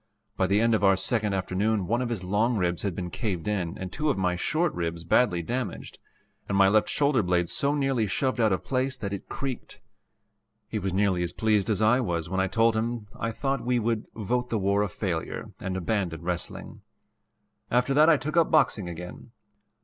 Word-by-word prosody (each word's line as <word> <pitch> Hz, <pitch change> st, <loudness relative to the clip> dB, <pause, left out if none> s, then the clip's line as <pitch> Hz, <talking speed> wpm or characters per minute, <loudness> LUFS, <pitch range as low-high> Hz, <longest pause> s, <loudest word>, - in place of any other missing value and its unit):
By 95 Hz, -, +1 dB
the 100 Hz, +2 st, +3 dB
end 115 Hz, +1 st, +3 dB
of 105 Hz, -2 st, +1 dB
our 95 Hz, -1 st, +6 dB
second 105 Hz, +1 st, 0 dB
afternoon 95 Hz, +2 st, 0 dB
one 120 Hz, +6 st, 0 dB
of 125 Hz, -, -2 dB
his 110 Hz, -6 st, -3 dB
long 110 Hz, +6 st, +1 dB
ribs 90 Hz, -3 st, 0 dB
had 100 Hz, -4 st, -2 dB
been 90 Hz, -1 st, -4 dB
caved 100 Hz, -8 st, -3 dB
in 95 Hz, -5 st, -2 dB
and 95 Hz, -1 st, -6 dB
two 150 Hz, 0 st, 0 dB
of 140 Hz, -, +1 dB
my 90 Hz, -2 st, +1 dB
short 155 Hz, -, 0 dB
ribs 85 Hz, -1 st, -3 dB
badly 85 Hz, -1 st, +2 dB
damaged, 125 Hz, +7 st, -4 dB, 0.5 s
and 100 Hz, -, +1 dB
my 100 Hz, 0 st, +6 dB
left 110 Hz, +1 st, +3 dB
shoulder 140 Hz, -4 st, +2 dB
blade 90 Hz, -2 st, +1 dB
so 140 Hz, +1 st, 0 dB
nearly 135 Hz, -6 st, +1 dB
shoved 130 Hz, +6 st, -1 dB
out 110 Hz, -2 st, +3 dB
of 95 Hz, -, 0 dB
place 130 Hz, 0 st, -1 dB
that 100 Hz, -1 st, -4 dB
it 100 Hz, -, -7 dB
creaked. 135 Hz, -2 st, -5 dB, 0.9 s
He -, -, -3 dB
was 95 Hz, 0 st, -2 dB
nearly 95 Hz, -1 st, +1 dB
as 85 Hz, 0 st, -2 dB
pleased 110 Hz, -1 st, +1 dB
as 110 Hz, 0 st, +1 dB
I 115 Hz, +4 st, +4 dB
was 85 Hz, -8 st, -2 dB
when 95 Hz, -, 0 dB
I 95 Hz, -, +2 dB
told 115 Hz, +2 st, +2 dB
him 115 Hz, -1 st, -2 dB
I 115 Hz, -, -2 dB
thought 135 Hz, +2 st, -2 dB
we 125 Hz, +1 st, +1 dB
would 115 Hz, -1 st, -1 dB
"vote 125 Hz, +3 st, -1 dB
the 115 Hz, -, 0 dB
war 100 Hz, 0 st, +1 dB
a 105 Hz, -, 0 dB
failure" 85 Hz, -3 st, -4 dB
and 95 Hz, 0 st, -3 dB
abandon 90 Hz, -3 st, -2 dB
wrestling. 90 Hz, +4 st, -5 dB, 0.9 s
After 125 Hz, +3 st, +2 dB
that 150 Hz, +3 st, +6 dB
I 160 Hz, -, +6 dB
took 155 Hz, +3 st, -4 dB
up 170 Hz, -2 st, +4 dB
boxing 110 Hz, -, +2 dB
again. 90 Hz, +7 st, -8 dB
105 Hz, 210 wpm, -27 LUFS, 95-120 Hz, 0.9 s, our